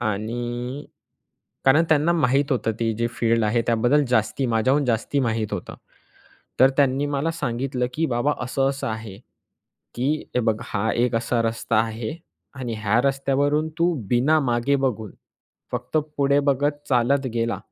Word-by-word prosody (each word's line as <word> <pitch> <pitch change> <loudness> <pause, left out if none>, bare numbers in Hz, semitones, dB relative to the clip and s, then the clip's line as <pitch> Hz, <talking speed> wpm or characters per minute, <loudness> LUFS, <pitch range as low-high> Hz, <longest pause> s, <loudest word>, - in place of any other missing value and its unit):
आणि 120 +5 -3 0.8
कारण 145 +5 +5
त्यांना 155 +2 +3
माहीत 140 -4 +2
होतं. 115 -3 0
ती 115 +1 -1
जी 115 +2 0
फील्ड 115 -1 +1
आहे 110 +3 +2
त्याबद्दल 120 +6 +3
जास्ती 115 +2 +1
माझ्याहून 130 +5 +2
जास्ती 120 +3 0
माहीत 115 -4 -1
होतं. 100 -4 -5 0.9
तर 130 +1 +7
त्यांनी 140 0 +2
मला 145 +2 -1
सांगितलं, 125 -4 -2
"की 160 +3 0
बाबा 125 +2 +1
असं 135 +2 0
असं 140 0 -5
आहे, 110 -3 -6 0.8
की 135 +5 +1 0.2
हे 125 - +2
बघ 110 -2 +1
हा 105 +1 -1
एक 120 0 +1
असा 115 +1 0
रस्ता 115 0 -1
आहे 110 +4 -1 0.4
आणि 125 -4 -4
ह्या 110 +2 +2
रस्त्यावरून 140 +3 +1
तू 170 +1 +3 0.2
बिना 130 +8 +3
मागे 125 +1 +1
बघून 120 -6 -2 0.6
फक्त 125 +4 -3 0.2
पुढे 140 0 +3
बघत 145 +2 0
चालत 130 +2 +2
गेला." 115 0 -1
125 Hz, 150 wpm, -23 LUFS, 115-140 Hz, 0.9 s, तर